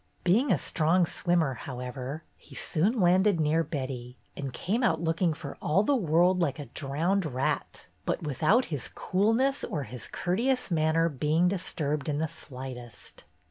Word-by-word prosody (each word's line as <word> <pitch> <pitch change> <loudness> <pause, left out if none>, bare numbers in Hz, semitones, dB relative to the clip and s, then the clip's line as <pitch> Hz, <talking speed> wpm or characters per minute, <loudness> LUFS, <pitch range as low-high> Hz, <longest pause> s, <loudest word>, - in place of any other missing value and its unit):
Being 220 +11 +3
a - - +4
strong 170 +2 +2
swimmer, 165 -4 +1
however, 130 +2 -6
he - - -15
soon 205 +10 +1
landed 185 +1 +4
near 160 +2 +2
Betty, 130 -5 -5 0.2
and 140 -2 -4
came 195 - -1
out 165 -10 +2
looking 165 +1 +1
for 155 - -7
all 185 +7 +2
the 280 +6 +2
world 180 - +3
like 145 -6 0
a 145 - -6
drowned 155 +10 -1
rat, 145 0 -2 0.2
but - - -2
without 155 - +2
his 135 -5 -1
coolness 225 +9 +1
or 150 -4 -2
his 120 -1 -7
courteous 235 +6 0
manner 160 0 +3
being 155 +4 +1
disturbed 155 -6 -2
in 145 - 0
the 160 +1 0
slightest. 130 -6 -9
160 Hz, 155 wpm, -28 LUFS, 140-185 Hz, 0.2 s, a